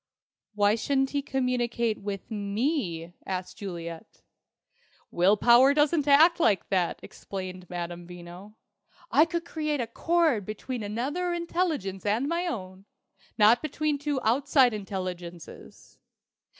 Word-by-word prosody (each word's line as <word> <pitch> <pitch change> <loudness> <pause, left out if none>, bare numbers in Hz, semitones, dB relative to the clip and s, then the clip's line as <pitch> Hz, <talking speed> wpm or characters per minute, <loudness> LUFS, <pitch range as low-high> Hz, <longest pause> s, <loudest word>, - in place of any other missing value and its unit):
"Why 205 0 +4
shouldn't 270 +4 0
he 285 - 0
communicate 240 -4 -1
with 200 +1 -6
me?" 200 - -2
asked 185 -1 -5
Juliet. 170 -5 -8 0.9
"Will 185 +4 +3
power 245 +5 +6
doesn't 295 0 +2
act 320 +5 +6
like 210 - +2
that," 185 -3 0
exclaimed 185 -2 -8
Madame 175 0 -6
Veno. 180 +4 -11 0.6
"I 310 - +6
could 340 0 -3
create 305 -3 -2
a 240 - 0
cord 315 - +1
between 220 +5 -5
another 275 - -2
intelligence 335 - -2
and 220 +6 0
my 340 +3 -1
own, 190 - -6 0.5
not 225 +2 +5
between 305 -1 -1
two 290 -1 -1
outside 260 +1 +3
intelligences. 185 -4 -7
225 Hz, 120 wpm, -27 LUFS, 190-285 Hz, 0.9 s, power